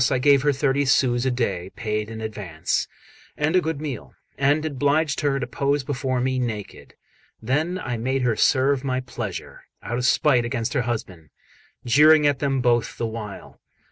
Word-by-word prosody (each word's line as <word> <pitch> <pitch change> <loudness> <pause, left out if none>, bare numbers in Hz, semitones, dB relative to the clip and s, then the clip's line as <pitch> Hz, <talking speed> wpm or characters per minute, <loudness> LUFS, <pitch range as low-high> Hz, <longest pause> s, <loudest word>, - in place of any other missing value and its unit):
I 130 - +1
gave 140 +1 +4
her 145 +1 +3
thirty 140 0 +1
sous 130 -2 +2
a - - +3
day, 100 -8 -2
paid 105 -2 -3
in 110 0 -7
advance, 100 -7 -3 0.5
and 150 +4 +1
a 185 - +5
good 160 -3 -3
meal, 145 -7 -6 0.2
and 145 +3 +2
obliged 145 +1 0
her 140 -2 +1
to 125 - -2
pose 140 -2 -1
before 130 -1 -2
me 130 +1 0
naked. 110 -5 -5 0.4
Then 150 +10 -1
I 125 -9 -4
made 130 +3 -1
her 120 -3 +2
serve 135 +2 +2
my 130 -1 -1
pleasure, 120 -6 -7 0.2
out 120 +1 -3
of 125 - -1
spite 130 -5 +3
against 120 0 -2
her - - +1
husband, 90 -9 -5 0.6
jeering 150 +5 +6
at 145 -2 +2
them 135 -2 0
both 120 -1 +1
the 115 - -2
while. 110 -3 -7
130 Hz, 175 wpm, -23 LUFS, 115-145 Hz, 0.6 s, jeering